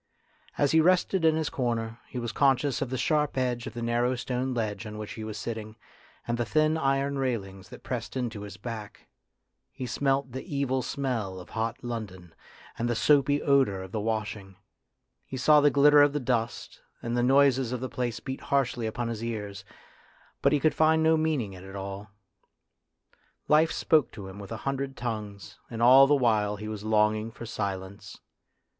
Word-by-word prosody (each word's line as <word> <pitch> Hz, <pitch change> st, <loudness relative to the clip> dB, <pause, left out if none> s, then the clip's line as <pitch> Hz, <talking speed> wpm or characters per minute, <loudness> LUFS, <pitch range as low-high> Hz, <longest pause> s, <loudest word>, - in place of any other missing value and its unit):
As 145 Hz, -1 st, +2 dB
he 160 Hz, -, +5 dB
rested 180 Hz, +1 st, +2 dB
in 160 Hz, -1 st, +4 dB
his 160 Hz, -2 st, -1 dB
corner, 115 Hz, -3 st, -2 dB
he -, -, -8 dB
was 120 Hz, -2 st, -3 dB
conscious 135 Hz, +1 st, +2 dB
of 135 Hz, -, -2 dB
the 130 Hz, -, -2 dB
sharp 150 Hz, 0 st, +1 dB
edge 125 Hz, -2 st, -1 dB
of -, -, -8 dB
the 120 Hz, -, -4 dB
narrow 120 Hz, +2 st, +1 dB
stone 125 Hz, +1 st, -2 dB
ledge 110 Hz, -3 st, -3 dB
on 105 Hz, 0 st, -7 dB
which 105 Hz, -1 st, -6 dB
he 110 Hz, -, -7 dB
was 110 Hz, -1 st, -6 dB
sitting 110 Hz, 0 st, -5 dB, 0.5 s
and 120 Hz, 0 st, -1 dB
the -, -, +2 dB
thin 155 Hz, +4 st, +2 dB
iron 140 Hz, -2 st, 0 dB
railings 100 Hz, -7 st, -3 dB
that -, -, -12 dB
pressed 125 Hz, 0 st, -4 dB
into 120 Hz, -5 st, -3 dB
his 100 Hz, -1 st, -8 dB
back; 110 Hz, -4 st, -8 dB, 0.6 s
he 130 Hz, -, -6 dB
smelt 135 Hz, +1 st, 0 dB
the 130 Hz, +2 st, -5 dB
evil 130 Hz, -2 st, 0 dB
smell 115 Hz, -10 st, -3 dB
of 90 Hz, -, -12 dB
hot 115 Hz, 0 st, -3 dB
London, 95 Hz, -8 st, -6 dB, 0.5 s
and 120 Hz, +1 st, 0 dB
the 120 Hz, -, 0 dB
soapy 145 Hz, +3 st, +3 dB
odour 130 Hz, -10 st, +2 dB
of 95 Hz, -, -10 dB
the 110 Hz, -, -2 dB
washing; 105 Hz, -3 st, -3 dB, 0.7 s
he 130 Hz, -, -7 dB
saw 150 Hz, +3 st, +5 dB
the 145 Hz, -, +5 dB
glitter 145 Hz, +1 st, +6 dB
of 145 Hz, 0 st, +4 dB
the 150 Hz, -, 0 dB
dust, 120 Hz, -3 st, -2 dB, 0.2 s
and 120 Hz, 0 st, -2 dB
the 120 Hz, -, +2 dB
noises 135 Hz, -1 st, +4 dB
of 125 Hz, -, -2 dB
the 130 Hz, -, -3 dB
place 120 Hz, -2 st, -3 dB
beat 130 Hz, +2 st, -6 dB
harshly 125 Hz, -4 st, 0 dB
upon 115 Hz, +2 st, -3 dB
his 115 Hz, -1 st, -4 dB
ears, 105 Hz, -4 st, -5 dB, 0.8 s
but 140 Hz, -, +4 dB
he 145 Hz, -, +3 dB
could 155 Hz, +2 st, +2 dB
find 160 Hz, 0 st, +3 dB
no 160 Hz, 0 st, +5 dB
meaning 155 Hz, -10 st, 0 dB
in 90 Hz, -1 st, -11 dB
it 95 Hz, +1 st, -10 dB
all. 100 Hz, +1 st, -6 dB, 1.4 s
Life 155 Hz, +2 st, +4 dB
spoke 150 Hz, -7 st, +2 dB
to 100 Hz, -3 st, -8 dB
him 95 Hz, +1 st, -10 dB
with 100 Hz, +1 st, -9 dB
a 115 Hz, -, -3 dB
hundred 135 Hz, 0 st, -2 dB
tongues, 105 Hz, -6 st, -6 dB
and 115 Hz, -, -6 dB
all 130 Hz, +3 st, +8 dB
the 145 Hz, -, +4 dB
while 110 Hz, -6 st, +2 dB
he 105 Hz, +1 st, -7 dB
was 105 Hz, -1 st, -6 dB
longing 110 Hz, 0 st, +2 dB
for 115 Hz, +1 st, -10 dB
silence. 100 Hz, -2 st, -5 dB
120 Hz, 190 wpm, -28 LUFS, 105-135 Hz, 1.4 s, all